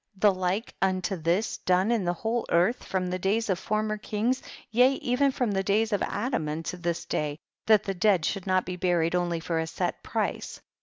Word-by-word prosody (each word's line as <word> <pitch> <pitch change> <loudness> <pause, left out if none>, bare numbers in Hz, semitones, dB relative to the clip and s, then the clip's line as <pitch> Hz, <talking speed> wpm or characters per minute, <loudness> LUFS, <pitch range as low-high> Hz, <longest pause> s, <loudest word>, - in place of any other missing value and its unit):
the 205 0 +5
like 185 +4 -2
unto 190 +1 +1
this 175 +6 0
done 185 +4 +2
in 230 -4 +1
the 175 - +1
whole 225 +6 -1
earth, 180 +9 +2
from 185 -1 -2
the 185 - -2
days 205 +3 +1
of 185 - 0
former 215 +1 -1
kings 225 +5 -1 0.3
t/ea 250 +4 +5
even 270 +3 +1
from 250 -4 -1
the 195 -1 +1
days 215 +3 +1
of 205 - +1
Adam, 205 - -1
unto 160 +3 -4
this 170 -1 -3
day, 150 -1 -2 0.3
that 215 -2 +6
the 195 - -2
dead 185 -3 +2
should 195 -2 -2
not 185 0 +2
be 180 - -4
buried 175 -2 +1
onl}^ 175 -2 0
for 165 -1 -1
a 160 - -2
set - - -3
price - - -3
190 Hz, 205 wpm, -27 LUFS, 175-215 Hz, 0.3 s, that